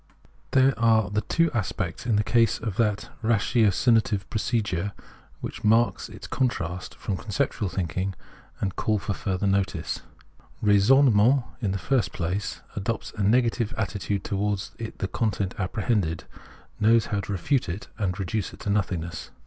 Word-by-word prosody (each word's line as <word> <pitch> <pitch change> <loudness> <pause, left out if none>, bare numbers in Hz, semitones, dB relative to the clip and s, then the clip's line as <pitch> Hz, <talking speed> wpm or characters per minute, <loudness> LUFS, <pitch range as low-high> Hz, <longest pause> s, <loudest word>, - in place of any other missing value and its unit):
There 130 0 +4
are 110 -2 +3
the 105 +1 +1
two 165 +9 +1
aspects 100 -1 -2
in 115 - +3
the 105 - +3
case 115 0 +3
of 110 -4 -4
that 105 -3 0
ratio 110 0 +3
cinative 105 -1 +2
procedure 105 -4 -1 0.5
which - - -6
mark 115 +2 +3
its - - -10
contrast 90 - -2
from 95 - -3
con - - -12
ceptual 105 -2 0
thinking 95 +2 -2 0.4
and 95 -2 -2
call 110 -1 +1
for 100 0 -2
further 95 -1 -2
notice. 95 -4 0 0.6
Raisonne 110 +6 +6
ment, 120 +6 +4 0.2
in 100 -5 0
the 95 - -1
first 120 +2 0
place, 90 +4 -3
adopts 110 +3 -3
a 105 - -4
negative 115 +1 +2
attitude 100 -1 -2
to - - -3
wards 100 -1 -1
the 110 -3 -4
content 100 -3 -1
apprehended; 95 -3 0 0.6
knows 115 +1 +5
how 100 - +2
to 100 - -5
refute 100 - 0
it 95 +4 -5
and 95 -3 -1
reduce 100 +1 -2
it - - -13
to 100 - -1
nothingness. 85 -5 -2
105 Hz, 155 wpm, -26 LUFS, 95-115 Hz, 0.6 s, Raisonne